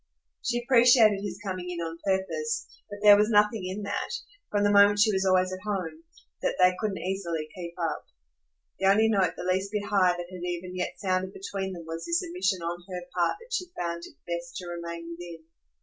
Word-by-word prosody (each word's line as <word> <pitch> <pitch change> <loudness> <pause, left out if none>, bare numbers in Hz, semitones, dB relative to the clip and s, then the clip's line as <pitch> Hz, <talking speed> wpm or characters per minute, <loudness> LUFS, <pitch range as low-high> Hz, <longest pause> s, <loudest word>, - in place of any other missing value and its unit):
She 240 0 -1
appreciated 235 -5 +6
his 200 -2 -5
coming 185 -2 -4
in 175 - -4
on 165 0 -4
purpose, 165 -6 -1 0.2
but 205 - -7
there 205 -1 +10
was 210 +1 +3
nothing 210 -2 +3
in 195 +3 -4
that 200 - -3 0.4
from 205 0 +1
the 205 - +4
moment 205 0 +6
she 210 +1 +5
was 190 0 +1
always 185 0 +3
at 185 - -5
home 205 - -3 0.4
that - - 0
they 185 0 +6
couldn't 210 -3 -1
easily 175 -4 -3
keep 170 -2 -7
up. 165 -3 -3 0.7
The 190 - +2
only 215 +3 +5
note 190 -5 +2
the - - -5
least 190 +2 0
bit 210 -1 -2
high 190 -4 +3
that 175 - -5
had 180 -1 -8
even 180 +1 -4
yet 180 - -2
sounded 185 0 -1
between 195 0 -4
them 170 -2 -8
was 165 +1 -6
this 340 +2 +1
admission 340 - -1
on 175 +1 -4
her 180 -1 -5
part 175 - +1
that 470 +1 -11
she 365 -6 -1
found 170 -1 -2
it - - -17
best 170 0 -5
to 180 - -5
remain 170 -1 -6
within. 170 -1 -9
185 Hz, 210 wpm, -27 LUFS, 175-205 Hz, 0.7 s, there